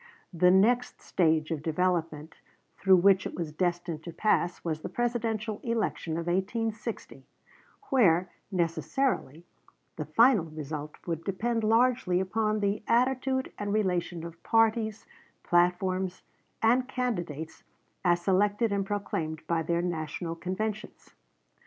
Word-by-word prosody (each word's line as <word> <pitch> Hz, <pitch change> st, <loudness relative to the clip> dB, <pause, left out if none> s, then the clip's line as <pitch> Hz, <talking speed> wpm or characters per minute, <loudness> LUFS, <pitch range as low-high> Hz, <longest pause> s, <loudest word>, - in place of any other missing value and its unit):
The 180 Hz, +1 st, +4 dB
next 225 Hz, +7 st, +3 dB
stage 160 Hz, -2 st, +1 dB
of 155 Hz, -3 st, -2 dB
development 160 Hz, -1 st, -1 dB, 0.4 s
through 190 Hz, -1 st, +6 dB
which 190 Hz, +1 st, +4 dB
it -, -, -8 dB
was 165 Hz, -3 st, -4 dB
destined 175 Hz, -1 st, -2 dB
to 170 Hz, -, -7 dB
pass 175 Hz, -2 st, 0 dB
was 155 Hz, -2 st, -2 dB
the -, -, -5 dB
Presidential 225 Hz, -3 st, -2 dB
election 225 Hz, -8 st, -2 dB
of 165 Hz, +1 st, -2 dB
1860, 215 Hz, +5 st, -3 dB, 0.7 s
where, 185 Hz, -9 st, +4 dB, 0.2 s
necessarily, 170 Hz, -, -1 dB, 0.5 s
the -, -, -3 dB
final 230 Hz, -6 st, +4 dB
result 150 Hz, -1 st, -6 dB
would 165 Hz, -2 st, -3 dB
depend 225 Hz, +5 st, -1 dB
largely 225 Hz, -4 st, +3 dB
upon 215 Hz, +3 st, 0 dB
the 200 Hz, +1 st, 0 dB
attitude 260 Hz, +2 st, +1 dB
and 205 Hz, -1 st, -2 dB
relation 180 Hz, -5 st, -1 dB
of 170 Hz, 0 st, -10 dB
parties, 225 Hz, -1 st, +1 dB, 0.4 s
platforms, 180 Hz, +1 st, +1 dB, 0.4 s
and 250 Hz, +3 st, +3 dB
candidates 175 Hz, -, -4 dB, 0.4 s
as 175 Hz, -1 st, +3 dB
selected 205 Hz, +4 st, +2 dB
and 200 Hz, -1 st, -1 dB
proclaimed 160 Hz, -6 st, -3 dB
by 170 Hz, -1 st, 0 dB
their 170 Hz, +2 st, 0 dB
National 165 Hz, 0 st, -3 dB
conventions. 205 Hz, +5 st, -5 dB
185 Hz, 120 wpm, -28 LUFS, 170-220 Hz, 0.7 s, through